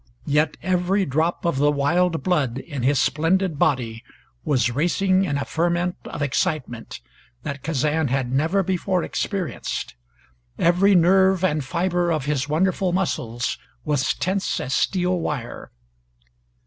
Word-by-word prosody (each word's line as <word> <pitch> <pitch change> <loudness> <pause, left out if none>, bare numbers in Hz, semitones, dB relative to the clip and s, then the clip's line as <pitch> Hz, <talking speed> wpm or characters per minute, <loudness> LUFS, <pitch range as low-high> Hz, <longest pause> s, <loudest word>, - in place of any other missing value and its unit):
Yet 150 +1 +1
every 185 +2 +1
drop 160 +6 -1
of 170 -5 +1
the 145 +1 +4
wild 165 +2 +1
blood 140 -10 +1
in 140 -1 -6
his 135 +3 +2
splendid 165 +4 +1
body 120 -6 0 0.4
was 125 -5 +1
racing 185 +7 +2
in 145 -6 -1
a 140 - -2
ferment 175 +2 0
of 145 - -4
excitement 140 - -2 0.4
that 140 -2 -5
Kazan 155 +1 0
had 130 -1 -1
never 160 +9 +1
before 185 0 0
experienced; 195 -5 -3 0.6
every 185 +4 +4
nerve 190 +1 +4
and 155 -5 +1
fiber 175 +4 0
of 155 -5 -1
his 145 -1 -1
wonderful 185 +3 +1
muscles 125 -10 -2 0.3
was 145 -3 +1
tense 190 +2 -1
as 130 - -3
steel 180 -1 +1
wire. 140 -7 -4
160 Hz, 135 wpm, -23 LUFS, 140-180 Hz, 0.6 s, the